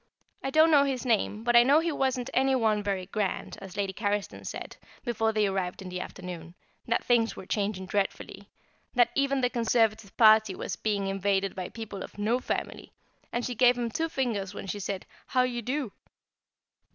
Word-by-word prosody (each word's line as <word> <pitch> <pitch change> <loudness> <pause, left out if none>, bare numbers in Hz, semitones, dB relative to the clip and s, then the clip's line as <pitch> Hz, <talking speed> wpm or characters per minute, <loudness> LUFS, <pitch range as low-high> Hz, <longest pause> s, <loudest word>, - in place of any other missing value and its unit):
I 270 - -1
don't 315 +3 +5
know 285 -2 +6
his 270 -2 -2
name, 220 -2 +1
but 240 0 +2
I 235 - +10
know 275 +5 +5
he 335 +1 0
wasn't 265 -3 -1
any 265 +1 +3
one 220 -4 +2
very 195 -2 -2
grand, 200 +1 -3
as 190 -1 -9
Lady 195 -1 -1
Carriston 205 0 -2
said, - - -7 0.3
before 225 -2 +1
they 215 -1 +2
arrived 190 -2 -2
in 190 - -7
the 180 0 -4
afternoon, 175 -2 -8 0.3
that 235 - +1
things 235 -2 +2
were - - -9
changing 200 -1 -2
dreadfully; 195 0 -3 0.5
that 245 -1 +4
even 275 -1 +1
the 250 - +2
Conservative 225 -3 +1
party 215 -3 +6
was - - -4
being 205 -2 -1
invaded 195 0 0
by 185 -1 -5
people 220 -3 -7
of - - -9
no 220 +4 +1
family; - - -4 0.4
and 240 0 -2
she 250 - -2
gave 245 +1 +4
him 235 -1 -2
two 325 +4 -1
fingers 210 -9 -2
when - - -6
she 205 +1 -4
said 195 -1 -4 0.2
"How 255 -1 +3
d'ye 240 -1 -3
do?" 255 0 -2
220 Hz, 190 wpm, -28 LUFS, 195-250 Hz, 0.5 s, I